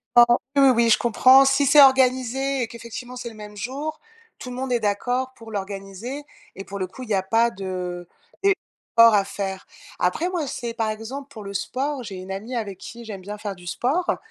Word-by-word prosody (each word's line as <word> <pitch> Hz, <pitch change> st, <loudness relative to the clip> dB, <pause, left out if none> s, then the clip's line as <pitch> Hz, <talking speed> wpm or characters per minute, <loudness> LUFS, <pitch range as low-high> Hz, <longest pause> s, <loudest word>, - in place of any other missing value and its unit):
Oui, 240 Hz, 0 st, +9 dB, 0.3 s
oui, 275 Hz, -1 st, +7 dB
oui, 235 Hz, 0 st, +3 dB
je -, -, +5 dB
comprends. 255 Hz, +3 st, +6 dB
Si 270 Hz, +1 st, +3 dB
c'est 290 Hz, +2 st, +7 dB
organisé 265 Hz, 0 st, +3 dB
et 235 Hz, -, -1 dB
qu'effectivement, 235 Hz, +2 st, -8 dB
c'est 245 Hz, -1 st, -6 dB
le 225 Hz, -, -13 dB
même 210 Hz, -1 st, -10 dB
jour, 280 Hz, +8 st, -4 dB, 0.4 s
tout 255 Hz, -, -8 dB
le -, -, -6 dB
monde 260 Hz, 0 st, -3 dB
est 240 Hz, -, +2 dB
d'accord 245 Hz, +5 st, -1 dB
pour 225 Hz, -1 st, -12 dB
l'organiser 200 Hz, +7 st, -6 dB, 0.3 s
et 195 Hz, -, -7 dB
pour 200 Hz, 0 st, -7 dB
le 190 Hz, -, -1 dB
coup, 185 Hz, +8 st, -12 dB
il 250 Hz, -, -8 dB
y 210 Hz, -, +2 dB
a 190 Hz, -, +1 dB
pas 230 Hz, +4 st, +3 dB
de 180 Hz, -3 st, -5 dB, 0.4 s
d'efforts 230 Hz, -, +3 dB
à 200 Hz, -, +4 dB
faire. 195 Hz, -1 st, -5 dB, 0.3 s
Après 245 Hz, -, 0 dB
moi, 350 Hz, -5 st, -2 dB
c'est, 235 Hz, -3 st, -5 dB
par 225 Hz, -2 st, 0 dB
exemple, 255 Hz, +6 st, -7 dB
pour 225 Hz, -6 st, -10 dB
le 200 Hz, 0 st, -7 dB
sport, 270 Hz, +6 st, -2 dB
j'ai 205 Hz, -4 st, -7 dB
une 185 Hz, +1 st, -8 dB
amie 215 Hz, +6 st, -5 dB
avec 205 Hz, -5 st, -4 dB
qui 235 Hz, +4 st, -10 dB
j'aime 205 Hz, -4 st, -7 dB
bien 205 Hz, +3 st, -7 dB
faire 205 Hz, -2 st, -5 dB
du 175 Hz, 0 st, -15 dB
sport 275 Hz, -, 0 dB
230 Hz, 215 wpm, -23 LUFS, 200-260 Hz, 0.4 s, Oui